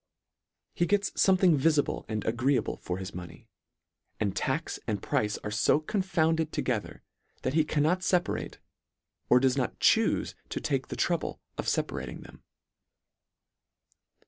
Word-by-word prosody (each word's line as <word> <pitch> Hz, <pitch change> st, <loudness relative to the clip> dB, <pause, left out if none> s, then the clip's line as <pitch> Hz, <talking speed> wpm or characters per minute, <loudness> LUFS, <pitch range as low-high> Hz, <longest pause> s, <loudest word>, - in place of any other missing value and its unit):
He 175 Hz, -, +1 dB
gets 200 Hz, +1 st, +1 dB
fome 190 Hz, -1 st, +4 dB
thing 180 Hz, -4 st, +5 dB
vifible 150 Hz, 0 st, +1 dB
and 110 Hz, -1 st, -3 dB
agreeable 125 Hz, +1 st, +1 dB
for 90 Hz, -, -4 dB
his 95 Hz, +1 st, -6 dB
money, 90 Hz, -1 st, -9 dB, 0.7 s
and 100 Hz, -3 st, -1 dB
tax 135 Hz, +9 st, -2 dB
and 105 Hz, -3 st, -1 dB
price 105 Hz, +2 st, 0 dB
are 105 Hz, -, -4 dB
fo 115 Hz, +6 st, +3 dB
confounded 160 Hz, -3 st, 0 dB
toge 120 Hz, -5 st, 0 dB
ther, -, -, -13 dB, 0.4 s
that 130 Hz, -, -1 dB
he 160 Hz, 0 st, +4 dB
cannot 155 Hz, +4 st, +1 dB
feparate, 180 Hz, -1 st, 0 dB, 0.7 s
or 125 Hz, -, +7 dB
does 130 Hz, +1 st, +2 dB
not 130 Hz, -, -1 dB
chufe 225 Hz, 0 st, +3 dB, 0.2 s
to -, -, -3 dB
take -, -, -1 dB
the -, -, -5 dB
trouble -, -, -1 dB, 0.2 s
of -, -, -4 dB
feparating -, -, -2 dB
them. -, -, -15 dB
145 Hz, 145 wpm, -29 LUFS, 110-165 Hz, 0.7 s, or